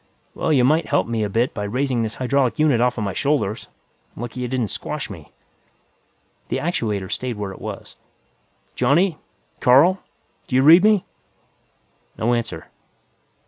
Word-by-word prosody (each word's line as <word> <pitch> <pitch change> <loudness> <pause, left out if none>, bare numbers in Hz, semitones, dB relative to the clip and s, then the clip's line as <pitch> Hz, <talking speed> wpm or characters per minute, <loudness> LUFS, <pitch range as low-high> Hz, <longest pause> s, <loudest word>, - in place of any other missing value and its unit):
"Well, - - -1
you 135 -5 +4
might 155 +6 +2
help - - +1
me 115 -1 -2
a 105 - -2
bit 115 +5 0
by 105 - -5
raising 125 +3 -1
this 110 -1 -3
hydraulic 130 +1 0
unit 150 -6 +3
offa 125 -2 +1
my 100 -2 -2
shoulders. 140 -7 -1 0.5
Lucky 120 +2 -6
it - - -2
didn't 120 -4 -2
squash - - -5
me." - - -11 1.2
The - - -1
actuator 105 - -2
stayed 125 -3 -3
where 100 -2 -4
it 95 - -12
was. - - -8 0.8
"Johnny! 155 +7 +2 0.4
Carl! 150 +10 +5 0.5
Do 125 - -3
you 130 - +4
read 165 +6 +8
me?" 210 -3 +4 1.1
No 120 +2 +1
answer. 115 -9 -3
125 Hz, 150 wpm, -21 LUFS, 115-145 Hz, 1.2 s, read